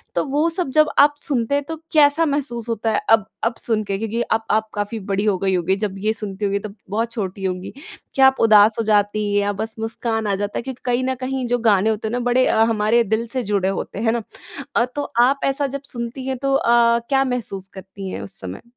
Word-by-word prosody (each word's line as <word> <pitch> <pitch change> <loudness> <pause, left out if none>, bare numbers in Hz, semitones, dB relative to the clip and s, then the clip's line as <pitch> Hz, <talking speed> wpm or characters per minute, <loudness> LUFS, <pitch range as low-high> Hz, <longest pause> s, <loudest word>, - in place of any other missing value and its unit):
तो - - +1
वो 295 +3 +1
सब 340 -3 +1
जब 305 - +5
आप 290 +1 +6
सुनते 275 -3 -1
हैं 285 - 0
तो 325 - -4 0.2
कैसा 300 +1 +5
महसूस 280 -5 -1
होता 225 0 -1
है? 215 - +1
अब 220 -2 +5 0.2
अब 230 +1 0
सुन 220 -2 0
के? 195 -1 -3
क्योंकि 225 +2 -2
अब 225 - +2
आप 220 +1 +1
काफ़ी 205 +2 -3
बड़ी 195 +1 0
हो 205 -3 +2
गई 190 +1 0
होंगी 180 +2 +1
जब 200 -2 -2
ये 215 +2 +1
सुनती 210 -2 -4
होगी 200 0 0
तब 200 0 -8
बहुत 225 +3 -1
छोटी 195 -4 -5
होंगी। 185 0 -3 0.4
क्या 270 -1 +7
आप 265 - +1
उदास 215 -1 +6
हो - - +1
जाती 210 0 +2
हैं 205 - +3
या 200 0 0
बस 220 0 -4
मुस्कान 225 0 -2
आ 200 - +1
जाता 205 +1 -3
है? - - -3
क्योंकि 260 -1 -7
कहीं 245 0 +1
न 260 0 -1
कहीं 265 -1 -2
जो 245 +1 +1
गाने 205 +1 +3
होते 220 0 -2
हैं - - -4
ना 245 - 0
बड़े 255 +1 +3
अ, - - +1
हमारे 225 +2 +2
दिल 220 +2 -1
से 255 -2 -1
जुड़े 195 -2 +1
होते 195 +1 -4
हैं। 225 - -2
है 225 - +3
ना? 235 -1 -2 0.5
अ, 235 - +4
तो 290 - -1 0.2
आप 275 +3 +3
ऐसा 275 +1 +1
जब 280 - -9
सुनती 240 +2 -5
हैं 265 0 -2
तो 275 +1 0
अ, 235 -3 +4
क्या 270 -1 +3
महसूस 220 -7 -3
करती 190 0 -8
हैं - - -5
उस 100 - -7
समय? 95 0 -7
225 Hz, 250 wpm, -21 LUFS, 205-255 Hz, 0.5 s, क्या